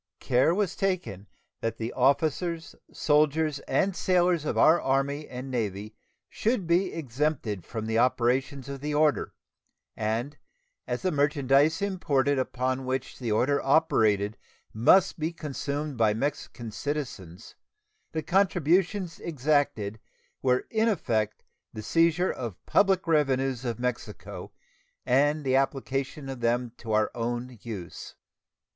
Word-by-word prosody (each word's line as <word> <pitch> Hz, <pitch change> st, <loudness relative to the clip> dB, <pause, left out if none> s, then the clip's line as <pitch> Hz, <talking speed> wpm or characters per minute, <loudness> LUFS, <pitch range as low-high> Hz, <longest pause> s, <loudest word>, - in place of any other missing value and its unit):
Care 130 Hz, +7 st, +2 dB
was 195 Hz, -3 st, 0 dB
taken 180 Hz, -, -2 dB, 0.3 s
that 115 Hz, -, -3 dB
the 115 Hz, +1 st, -4 dB
officers, 160 Hz, +5 st, +1 dB, 0.2 s
soldiers, 150 Hz, -1 st, +2 dB
and 195 Hz, -1 st, +1 dB
sailors 180 Hz, -4 st, +2 dB
of -, -, -2 dB
our 165 Hz, +2 st, +5 dB
Army 140 Hz, +2 st, 0 dB
and 130 Hz, +1 st, -7 dB
Navy 105 Hz, -3 st, -3 dB, 0.3 s
should 220 Hz, -4 st, -1 dB
be 175 Hz, +3 st, +2 dB
exempted 130 Hz, -, -2 dB
from 110 Hz, -2 st, -5 dB
the 110 Hz, 0 st, +1 dB
operations 130 Hz, +2 st, +1 dB
of 140 Hz, -1 st, -6 dB
the 150 Hz, 0 st, -2 dB
order, 150 Hz, -1 st, +2 dB, 0.6 s
and, 115 Hz, +7 st, -2 dB, 0.5 s
as -, -, -3 dB
the 185 Hz, -, +1 dB
merchandise 145 Hz, +3 st, +2 dB
imported 145 Hz, -8 st, +1 dB
upon 130 Hz, 0 st, -1 dB
which 130 Hz, +1 st, -3 dB
the 120 Hz, -4 st, -2 dB
order 130 Hz, +7 st, +2 dB
operated 110 Hz, -8 st, +2 dB, 0.4 s
must 175 Hz, -, +4 dB
be 160 Hz, +2 st, -1 dB
consumed 145 Hz, -3 st, -4 dB
by 110 Hz, -2 st, +3 dB
Mexican 120 Hz, -3 st, -4 dB
citizens, 110 Hz, -, -5 dB, 0.6 s
the 160 Hz, -1 st, -3 dB
contributions 180 Hz, +1 st, +1 dB
exacted 140 Hz, -9 st, 0 dB, 0.4 s
were 125 Hz, -1 st, +2 dB
in 220 Hz, 0 st, +2 dB
effect 110 Hz, -, -1 dB, 0.3 s
the 110 Hz, -, -7 dB
seizure 165 Hz, -, +2 dB
of 120 Hz, -5 st, -5 dB
the -, -, -24 dB
public 195 Hz, -2 st, +3 dB
revenues 135 Hz, -5 st, +1 dB
of 120 Hz, -3 st, -2 dB
Mexico 105 Hz, -6 st, -5 dB, 0.5 s
and 145 Hz, +4 st, +2 dB
the 130 Hz, -1 st, +1 dB
application 135 Hz, +1 st, -1 dB
of 135 Hz, -2 st, -6 dB
them 120 Hz, +1 st, 0 dB
to 115 Hz, -, -7 dB
our 110 Hz, 0 st, +2 dB
own 120 Hz, 0 st, -4 dB
use. 100 Hz, -8 st, -8 dB
135 Hz, 130 wpm, -27 LUFS, 120-160 Hz, 0.6 s, our